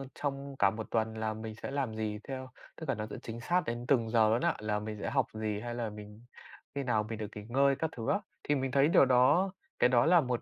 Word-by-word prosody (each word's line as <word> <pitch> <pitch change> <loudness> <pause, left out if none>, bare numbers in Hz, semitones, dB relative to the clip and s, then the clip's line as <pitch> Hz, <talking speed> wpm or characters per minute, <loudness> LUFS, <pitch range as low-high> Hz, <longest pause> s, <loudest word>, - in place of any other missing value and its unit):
trong 140 -1 -4
cả 100 - +6
một 110 +2 -6
tuần 110 -1 +1
là 110 0 -1
mình 110 0 -7
sẽ 125 - -6
làm 135 -6 -2
gì 105 -1 -2
theo 130 -1 -5 0.3
tức 160 -4 -8
là - - +2
nó 105 0 -4
sẽ - - -6
chính 115 0 -6
xác 175 +7 +2
đến 120 +1 -3
từng 115 -5 +3
giờ 110 -2 +4
luôn 115 +3 +2
á, - - +2
là 105 -1 -1
mình 105 0 -5
sẽ - - -2
học 135 -4 +2
gì 110 -1 -2
hay 120 +1 -5
là 115 -2 -2
mình 105 +2 -11 0.5
khi 140 - -1
nào 110 -4 +1
mình 110 +1 -5
được 105 - -3
nghỉ 105 - -6
ngơi 140 +2 +4
các 160 +3 -1
thứ 115 - -3
á. 205 - +3 0.2
Thì 145 - +1
mình 135 -1 -1
thấy 140 +2 +4
điều 150 - +6
đó 140 +10 +4 0.3
cái 125 - +5
đó 120 +2 +4
là 170 0 +6
một, 125 -3 -1
120 Hz, 270 wpm, -31 LUFS, 110-135 Hz, 0.5 s, cả